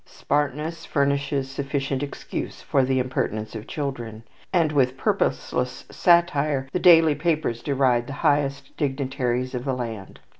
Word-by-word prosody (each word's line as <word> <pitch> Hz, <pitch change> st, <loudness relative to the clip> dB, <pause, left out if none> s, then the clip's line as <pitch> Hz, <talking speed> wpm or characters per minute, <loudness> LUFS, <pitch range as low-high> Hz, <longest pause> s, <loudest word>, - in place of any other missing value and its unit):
Smartness 150 Hz, +3 st, -2 dB
furnishes 140 Hz, -1 st, 0 dB
sufficient 135 Hz, -1 st, -2 dB
excuse 145 Hz, -1 st, -5 dB
for 135 Hz, -, +2 dB
the 130 Hz, 0 st, +1 dB
impertinence 110 Hz, -4 st, -2 dB
of 110 Hz, 0 st, -7 dB
children, 120 Hz, -7 st, -5 dB, 0.3 s
and 165 Hz, -5 st, +2 dB
with 130 Hz, -3 st, +2 dB
purposeless 125 Hz, -1 st, -1 dB
satire 150 Hz, -6 st, +3 dB
the 180 Hz, -, +1 dB
daily 165 Hz, -4 st, +7 dB
papers 150 Hz, -6 st, -1 dB
deride 130 Hz, -4 st, +1 dB
the 140 Hz, -, -5 dB
highest 140 Hz, -1 st, +1 dB
dignitaries 130 Hz, -3 st, -1 dB
of 125 Hz, -1 st, -3 dB
the 135 Hz, -1 st, -1 dB
land. 115 Hz, -6 st, -6 dB
135 Hz, 135 wpm, -24 LUFS, 125-145 Hz, 0.3 s, daily